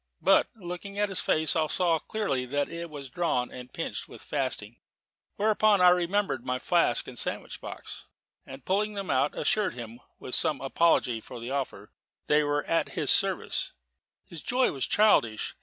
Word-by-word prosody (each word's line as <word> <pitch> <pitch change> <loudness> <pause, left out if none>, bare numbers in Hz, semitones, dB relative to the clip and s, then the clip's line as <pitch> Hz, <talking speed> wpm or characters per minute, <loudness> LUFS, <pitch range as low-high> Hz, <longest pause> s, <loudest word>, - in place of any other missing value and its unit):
But - - +5
looking 195 0 -7
at 205 0 +1
his 190 - -1
face, 155 +1 +1
I 160 -1 +2
saw 170 0 +2
clearly 140 -11 -2
that 145 +2 -1
it 170 0 -6
was 140 -4 -8
drawn 135 -7 -1
and 125 0 -10
pinched - - -5
with - - -12
fasting. - - -3 0.6
Whereupon 215 -1 +3
I 180 0 +7
remembered 180 - +1
my 125 0 -1
flask 170 -3 +1
and 125 - -6
sandwich - - -3
box, - - -9 0.4
and 135 0 -11
pulling 210 +2 0
them 200 -2 -3
out, 140 +3 +1
assured 210 - +1
him, 120 -1 -8 0.2
with 125 - -8
some 155 -4 +3
apology 135 -5 +2
for 120 - -10
the 120 +3 -6
offer, 140 -1 -4 0.3
that - - 0
they 150 0 +5
were 145 0 0
at 165 - 0
his - - +3
service. - - +2 0.5
His 165 -3 -8
joy 255 +1 +1
was 135 - -2
childish. 120 - +3
160 Hz, 175 wpm, -28 LUFS, 130-195 Hz, 0.6 s, I